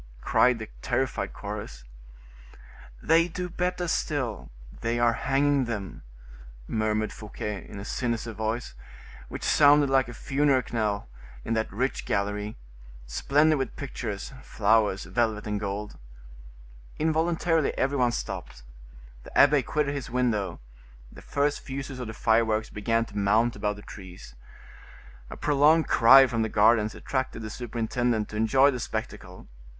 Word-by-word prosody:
cried 125 Hz, -1 st, +3 dB
the 110 Hz, -1 st, -7 dB
terrified 130 Hz, +1 st, -1 dB
chorus. -, -, -7 dB, 1.2 s
"They 165 Hz, +1 st, +4 dB
do 180 Hz, +1 st, -5 dB
better 180 Hz, 0 st, -2 dB
still; 135 Hz, -9 st, -2 dB, 0.3 s
they 115 Hz, +1 st, -1 dB
are 120 Hz, -1 st, +3 dB
hanging 140 Hz, +2 st, +1 dB
them," 105 Hz, -6 st, -5 dB, 0.7 s
murmured 110 Hz, 0 st, -1 dB
Fouquet, 105 Hz, -1 st, -6 dB
in -, -, -9 dB
a 100 Hz, -, -7 dB
sinister 115 Hz, -1 st, -2 dB
voice, 110 Hz, +3 st, -3 dB, 0.6 s
which -, -, -7 dB
sounded 145 Hz, -1 st, +5 dB
like 135 Hz, -1 st, +3 dB
a 120 Hz, -, -9 dB
funeral 140 Hz, -1 st, +1 dB
knell 105 Hz, -, -1 dB, 0.4 s
in -, -, -1 dB
that 110 Hz, 0 st, -1 dB
rich 130 Hz, +2 st, -2 dB
gallery, 105 Hz, +1 st, -2 dB, 0.5 s
splendid 150 Hz, -, +2 dB
with 135 Hz, -2 st, -3 dB
pictures, 115 Hz, -4 st, -5 dB
flowers, 105 Hz, -4 st, +1 dB
velvet, 110 Hz, -3 st, -1 dB
and 105 Hz, -1 st, -2 dB
gold. 105 Hz, +1 st, -5 dB, 1.0 s
Involuntarily 160 Hz, 0 st, +1 dB
every 140 Hz, +2 st, 0 dB
one 120 Hz, -1 st, +3 dB
stopped; 60 Hz, -, -6 dB, 0.6 s
the -, -, -8 dB
abbe 145 Hz, 0 st, +6 dB
quitted 145 Hz, +3 st, -1 dB
his 140 Hz, -3 st, -5 dB
window; 110 Hz, -7 st, -1 dB, 0.5 s
the -, -, -13 dB
first 145 Hz, +1 st, 0 dB
fuses 135 Hz, -1 st, -6 dB
of 125 Hz, -, -5 dB
the 110 Hz, -, -6 dB
fireworks 110 Hz, -1 st, +1 dB
began 115 Hz, +2 st, 0 dB
to 105 Hz, -, -15 dB
mount 110 Hz, +4 st, +2 dB
above 105 Hz, 0 st, -2 dB
the 105 Hz, -, -12 dB
trees. 90 Hz, -, -11 dB, 1.0 s
A -, -, -8 dB
prolonged 150 Hz, +3 st, +3 dB
cry 135 Hz, +3 st, +7 dB
from 120 Hz, -3 st, -1 dB
the 110 Hz, -, 0 dB
gardens 110 Hz, 0 st, +3 dB
attracted 130 Hz, -4 st, -3 dB
the 110 Hz, -, -6 dB
superintendent 120 Hz, 0 st, -2 dB
to -, -, -9 dB
enjoy 130 Hz, +6 st, +4 dB
the 125 Hz, -, -4 dB
spectacle. -, -, -6 dB
120 Hz, 140 wpm, -27 LUFS, 105-140 Hz, 1.2 s, cry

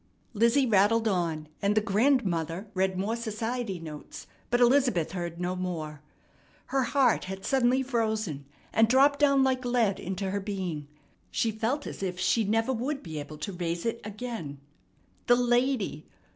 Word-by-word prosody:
Lizzie 235 Hz, +5 st, +3 dB
rattled 225 Hz, +1 st, +3 dB
on, 165 Hz, -6 st, -1 dB
and 205 Hz, 0 st, +2 dB
the -, -, +5 dB
grandmother 200 Hz, -, +1 dB
read 190 Hz, 0 st, 0 dB
more 205 Hz, +5 st, -1 dB
society 230 Hz, -2 st, -3 dB
notes, 155 Hz, -2 st, -9 dB, 0.2 s
but 240 Hz, -, +2 dB
Elizabeth 245 Hz, -, +3 dB
heard 175 Hz, -2 st, -5 dB
no 180 Hz, +1 st, -1 dB
more. 160 Hz, -5 st, -4 dB, 0.7 s
Her 270 Hz, -2 st, +2 dB
hear 260 Hz, -1 st, +3 dB
had 190 Hz, +1 st, -6 dB
suddenly 260 Hz, 0 st, +2 dB
frozen, 220 Hz, -, -1 dB, 0.3 s
and 225 Hz, 0 st, +5 dB
dropped 275 Hz, +4 st, +4 dB
down 280 Hz, -2 st, +4 dB
like 260 Hz, -1 st, +1 dB
lead 240 Hz, -5 st, +1 dB
into 190 Hz, +1 st, -3 dB
her 200 Hz, -, -1 dB
being. 185 Hz, -7 st, -4 dB, 0.4 s
She 225 Hz, -, 0 dB
felt 235 Hz, +7 st, -2 dB
as -, -, -7 dB
if 180 Hz, -2 st, -3 dB
she 225 Hz, +5 st, +2 dB
never 225 Hz, +5 st, +1 dB
would 275 Hz, +4 st, -3 dB
be 160 Hz, -3 st, -5 dB
able 150 Hz, +1 st, -8 dB
to 200 Hz, +5 st, -5 dB
raise 170 Hz, 0 st, -3 dB
it 230 Hz, 0 st, -2 dB
again. 210 Hz, -8 st, -6 dB, 0.7 s
The 245 Hz, -, +7 dB
lady! 245 Hz, -, +1 dB
215 Hz, 160 wpm, -28 LUFS, 180-245 Hz, 0.7 s, The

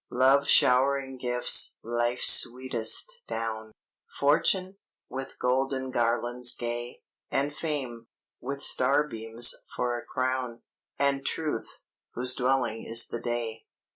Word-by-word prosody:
Love 135 Hz, +3 st, +3 dB
showering 135 Hz, +1 st, +3 dB
gifts 125 Hz, -1 st, +3 dB
(life's 120 Hz, +1 st, 0 dB
sweetest) 130 Hz, -, 0 dB
down; 110 Hz, -1 st, -5 dB, 0.5 s
Fortune, 185 Hz, +7 st, +2 dB, 0.3 s
with 135 Hz, 0 st, -7 dB
golden 130 Hz, +1 st, -1 dB
garlands 120 Hz, +1 st, -1 dB
gay; 120 Hz, 0 st, -5 dB, 0.3 s
And 145 Hz, +2 st, -1 dB
Fame, 130 Hz, -7 st, -4 dB, 0.3 s
with 140 Hz, +2 st, -5 dB
starbeams 120 Hz, -4 st, +1 dB, 0.2 s
for 120 Hz, -1 st, -1 dB
a -, -, -11 dB
crown; 130 Hz, -2 st, -3 dB, 0.3 s
And 140 Hz, -1 st, 0 dB
Truth, 150 Hz, -4 st, -4 dB, 0.4 s
whose 125 Hz, +1 st, 0 dB
dwelling 125 Hz, -3 st, -1 dB
is 115 Hz, +1 st, +2 dB
the 115 Hz, -, -5 dB
day." 115 Hz, -2 st, -4 dB
125 Hz, 105 wpm, -27 LUFS, 120-135 Hz, 0.5 s, Love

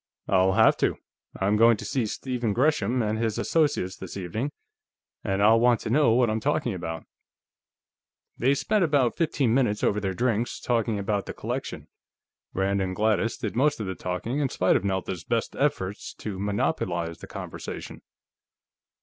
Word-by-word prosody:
"I'll 95 Hz, 0 st, +3 dB
have -, -, +5 dB
to. -, -, +1 dB, 0.4 s
I'm 100 Hz, +2 st, +2 dB
going 115 Hz, 0 st, +6 dB
to -, -, -7 dB
see 130 Hz, -6 st, -1 dB
Stephen 120 Hz, -1 st, -2 dB
Gresham 125 Hz, -2 st, +2 dB
and 110 Hz, +1 st, -1 dB
his 115 Hz, -2 st, -1 dB
associates 145 Hz, -, +1 dB
this 95 Hz, 0 st, -8 dB
evening, 105 Hz, +9 st, -3 dB, 0.7 s
and 95 Hz, +1 st, 0 dB
I'll 110 Hz, +2 st, +6 dB
want 120 Hz, -1 st, +4 dB
to -, -, -4 dB
know 135 Hz, -3 st, +4 dB
what 125 Hz, 0 st, +4 dB
I'm 110 Hz, 0 st, 0 dB
talking -, -, 0 dB
about." 80 Hz, -1 st, -5 dB, 1.3 s
They 135 Hz, +4 st, +2 dB
spent 205 Hz, +8 st, +1 dB
about 140 Hz, -7 st, +2 dB
fifteen 145 Hz, -8 st, +1 dB
minutes 120 Hz, -5 st, +1 dB
over 105 Hz, -, +2 dB
their 95 Hz, -2 st, -2 dB
drinks, 120 Hz, +2 st, 0 dB
talking 115 Hz, -3 st, 0 dB
about 100 Hz, 0 st, -1 dB
the -, -, -6 dB
collection. -, -, -5 dB, 0.6 s
Rand 100 Hz, +1 st, 0 dB
and 95 Hz, -1 st, -2 dB
Gladys 110 Hz, +1 st, +1 dB
did -, -, -4 dB
most 145 Hz, +3 st, +2 dB
of 105 Hz, -, -3 dB
the 95 Hz, -, -3 dB
talking, 95 Hz, +10 st, -3 dB
in 140 Hz, -2 st, +1 dB
spite 95 Hz, -, +2 dB
of -, -, +1 dB
Nelda's 95 Hz, -3 st, -2 dB
best 115 Hz, +3 st, -1 dB
efforts 115 Hz, -9 st, -2 dB
to 100 Hz, -3 st, -6 dB
monopolize 90 Hz, -4 st, -1 dB
the -, -, -10 dB
conversation. -, -, -7 dB
110 Hz, 165 wpm, -26 LUFS, 95-125 Hz, 1.3 s, going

